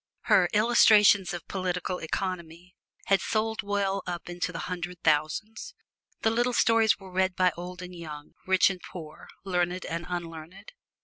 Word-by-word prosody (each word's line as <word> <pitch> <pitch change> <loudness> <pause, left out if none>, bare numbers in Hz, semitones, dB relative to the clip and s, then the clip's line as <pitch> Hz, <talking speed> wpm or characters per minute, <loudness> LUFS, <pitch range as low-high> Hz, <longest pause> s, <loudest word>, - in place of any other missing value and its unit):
Her - - +4
"Illustrations 210 -3 +5
of 175 -2 -7
Political 180 -1 -3
Economy" 175 0 -5 0.3
had 195 -2 +3
sold 220 0 -1
well 200 -1 -1
up 175 -1 -5
into 175 +1 -3
the 165 - -5
hundred 180 -1 -5
thousands. 165 - -1 0.5
The 225 - +3
little 240 +2 +1
stories 225 -2 +4
were 190 -2 -13
read 185 0 +1
by 180 0 +3
old 180 +1 -7
and 180 0 -9
young, 150 -3 -9
rich 190 +1 +4
and 185 -2 -8
poor, 155 -4 -10 0.2
learned 180 -1 -1
and 170 +1 -4
unlearned. 170 +2 -7
180 Hz, 150 wpm, -27 LUFS, 175-200 Hz, 0.5 s, Illustrations